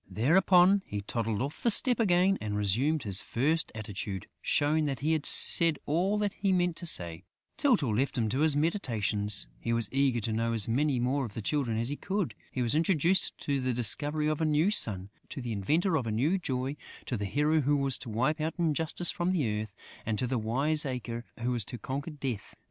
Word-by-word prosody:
Thereupon, 180 Hz, -, +4 dB
he 105 Hz, 0 st, -4 dB
toddled 110 Hz, +1 st, -2 dB
off 140 Hz, +2 st, -6 dB
the 235 Hz, -, +2 dB
step 245 Hz, +2 st, +4 dB
again 190 Hz, -2 st, +3 dB
and 105 Hz, -1 st, -3 dB
resumed 125 Hz, +10 st, +1 dB
his 100 Hz, -2 st, +4 dB
first 155 Hz, +7 st, -1 dB
attitude, 100 Hz, -3 st, -6 dB, 0.2 s
showing 150 Hz, +2 st, +1 dB
that 135 Hz, -3 st, -3 dB
he 155 Hz, +3 st, 0 dB
had 155 Hz, -2 st, 0 dB
said 165 Hz, -3 st, +6 dB
all 180 Hz, +7 st, 0 dB
that 205 Hz, -1 st, -1 dB
he 195 Hz, -1 st, -1 dB
meant 175 Hz, -2 st, +1 dB
to 175 Hz, -, -5 dB
say. 85 Hz, -, -4 dB, 0.3 s
Tyltyl 180 Hz, -, +1 dB
left 135 Hz, +3 st, -1 dB
him 115 Hz, -2 st, +1 dB
to 130 Hz, -, -2 dB
his 155 Hz, -1 st, +2 dB
meditations; 110 Hz, -, 0 dB
he 115 Hz, -, -3 dB
was 115 Hz, -1 st, -1 dB
eager 135 Hz, -3 st, +2 dB
to 110 Hz, +1 st, -3 dB
know 115 Hz, +1 st, -1 dB
as 110 Hz, -3 st, +2 dB
many 135 Hz, +3 st, +1 dB
more 130 Hz, +3 st, 0 dB
of 110 Hz, -5 st, -7 dB
the 115 Hz, -, -4 dB
Children 125 Hz, -4 st, -1 dB
as 115 Hz, +2 st, -1 dB
he 145 Hz, -, -4 dB
could. 190 Hz, -, -2 dB, 0.2 s
He 125 Hz, -, -2 dB
was 115 Hz, -, 0 dB
introduced 170 Hz, +3 st, +1 dB
to 140 Hz, -2 st, -1 dB
the 130 Hz, 0 st, -1 dB
discoverer 145 Hz, +6 st, +1 dB
of 155 Hz, -, -3 dB
a -, -, +2 dB
new 155 Hz, +6 st, +2 dB
sun, 100 Hz, -, 0 dB, 0.2 s
to -, -, -6 dB
the 120 Hz, -2 st, -5 dB
inventor 155 Hz, -, 0 dB
of 130 Hz, -7 st, -1 dB
a -, -, -2 dB
new 145 Hz, -, +1 dB
joy, 130 Hz, -2 st, -3 dB, 0.3 s
to 125 Hz, -, -3 dB
the 105 Hz, -2 st, -3 dB
hero 150 Hz, +10 st, +1 dB
who 145 Hz, +1 st, +1 dB
was 135 Hz, -2 st, +1 dB
to 125 Hz, -, -7 dB
wipe 130 Hz, +8 st, 0 dB
out 160 Hz, +1 st, -2 dB
injustice 165 Hz, +1 st, 0 dB
from 175 Hz, +1 st, -1 dB
the 115 Hz, -, -1 dB
earth 110 Hz, -2 st, -9 dB, 0.3 s
and 110 Hz, -1 st, -2 dB
to 125 Hz, -, -1 dB
the 125 Hz, 0 st, -1 dB
wiseacre 125 Hz, -1 st, -2 dB, 0.2 s
who 125 Hz, +1 st, -1 dB
was 120 Hz, -3 st, -1 dB
to 120 Hz, -, -7 dB
conquer 140 Hz, +7 st, -5 dB
Death.... 135 Hz, -9 st, -6 dB
135 Hz, 215 wpm, -29 LUFS, 115-160 Hz, 0.3 s, said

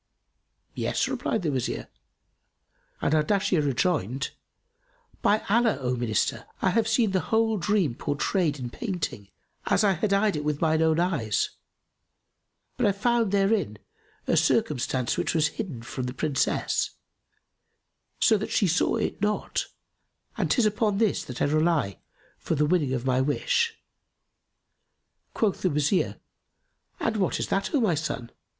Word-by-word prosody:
"Yes," -, -, 0 dB
replied 220 Hz, -, -2 dB
the 155 Hz, -, 0 dB
Wazir; 120 Hz, -, -2 dB, 1.2 s
and -, -, +2 dB
Ardashir 170 Hz, +2 st, +2 dB
rejoined, 140 Hz, -, 0 dB, 0.9 s
"By 215 Hz, +1 st, +2 dB
Allah, 230 Hz, +2 st, +3 dB
O 125 Hz, -1 st, -1 dB
Minister, 120 Hz, -4 st, -1 dB
I 185 Hz, -, +2 dB
have 225 Hz, +2 st, +2 dB
seen 225 Hz, -2 st, +2 dB
the 190 Hz, -, +2 dB
whole 225 Hz, -1 st, +2 dB
dream 195 Hz, -, +1 dB
pourtrayed 150 Hz, -, -1 dB
in 125 Hz, -3 st, -6 dB
painting, 175 Hz, -, -4 dB, 0.4 s
as 205 Hz, -, +3 dB
I 200 Hz, -, +4 dB
had 195 Hz, +3 st, -1 dB
eyed 200 Hz, 0 st, +3 dB
it 150 Hz, -, -3 dB
with 150 Hz, -1 st, -1 dB
mine 160 Hz, -1 st, +2 dB
own 160 Hz, 0 st, +3 dB
eyes; 140 Hz, -, 0 dB, 1.3 s
but 245 Hz, -4 st, +2 dB
I 200 Hz, -, +3 dB
found 230 Hz, +1 st, +1 dB
therein 195 Hz, -, +1 dB, 0.5 s
a -, -, +2 dB
circumstance 130 Hz, -3 st, +1 dB
which -, -, -1 dB
was 155 Hz, -1 st, +3 dB
hidden 155 Hz, -, -6 dB
from 125 Hz, +1 st, -5 dB
the 125 Hz, -, -6 dB
Princess, 145 Hz, 0 st, 0 dB, 1.2 s
so 220 Hz, -3 st, +4 dB
that 215 Hz, -, -4 dB
she 205 Hz, -, +2 dB
saw 170 Hz, +1 st, +2 dB
it -, -, -2 dB
not, 210 Hz, 0 st, -1 dB, 0.7 s
and -, -, -1 dB
'tis 245 Hz, -, +3 dB
upon 210 Hz, -1 st, +1 dB
this 220 Hz, -2 st, +1 dB
that 125 Hz, -1 st, -3 dB
I -, -, +4 dB
rely 155 Hz, -, +1 dB, 0.4 s
for -, -, -2 dB
the 150 Hz, 0 st, +2 dB
winning 150 Hz, -5 st, +1 dB
of 125 Hz, -1 st, -2 dB
my 130 Hz, 0 st, +2 dB
wish." 465 Hz, -, 0 dB, 1.6 s
Quoth 210 Hz, -4 st, 0 dB
the 185 Hz, -, +2 dB
Wazir, 150 Hz, +4 st, +1 dB, 0.8 s
"And 225 Hz, -1 st, 0 dB
what 190 Hz, -3 st, 0 dB
is -, -, -2 dB
that, 195 Hz, -, 0 dB
O -, -, +4 dB
my 215 Hz, -8 st, +2 dB
son?" 145 Hz, -6 st, -3 dB
170 Hz, 145 wpm, -26 LUFS, 140-210 Hz, 1.6 s, I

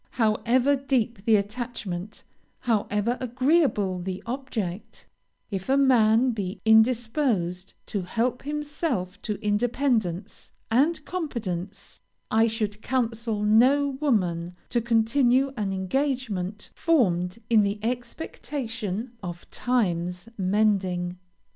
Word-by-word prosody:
However 240 Hz, +4 st, +2 dB
deep 245 Hz, -6 st, -1 dB
the 225 Hz, -, +5 dB
attachment, 210 Hz, -3 st, -4 dB, 0.4 s
however 225 Hz, 0 st, 0 dB
agreeable 255 Hz, -, +2 dB
the 185 Hz, +1 st, -5 dB
object, 230 Hz, -7 st, -5 dB, 0.5 s
if 190 Hz, +3 st, -4 dB
a 270 Hz, -, +4 dB
man 250 Hz, -2 st, +4 dB
be 200 Hz, -3 st, -4 dB
indisposed 220 Hz, -, +2 dB
to 200 Hz, -, -3 dB
help 235 Hz, +7 st, -1 dB
himself 290 Hz, -, -3 dB
to 210 Hz, -, -2 dB
independence 220 Hz, -3 st, 0 dB, 0.2 s
and 300 Hz, +6 st, +2 dB
competence, 205 Hz, -, -5 dB, 0.3 s
I 225 Hz, +1 st, +4 dB
should 215 Hz, -2 st, -2 dB
counsel 230 Hz, -3 st, -1 dB
no 255 Hz, +7 st, +5 dB
woman 180 Hz, -, 0 dB
to 235 Hz, -, +1 dB
continue 240 Hz, +4 st, +3 dB
an 205 Hz, -4 st, -2 dB
engagement 210 Hz, -1 st, -2 dB
formed 185 Hz, -, +1 dB
in 225 Hz, -2 st, +5 dB
the 200 Hz, +1 st, 0 dB
expectation 240 Hz, -, -4 dB
of 175 Hz, -2 st, -7 dB
'times 180 Hz, -7 st, -1 dB
mending.' 185 Hz, -3 st, +1 dB
225 Hz, 100 wpm, -26 LUFS, 195-255 Hz, 0.5 s, the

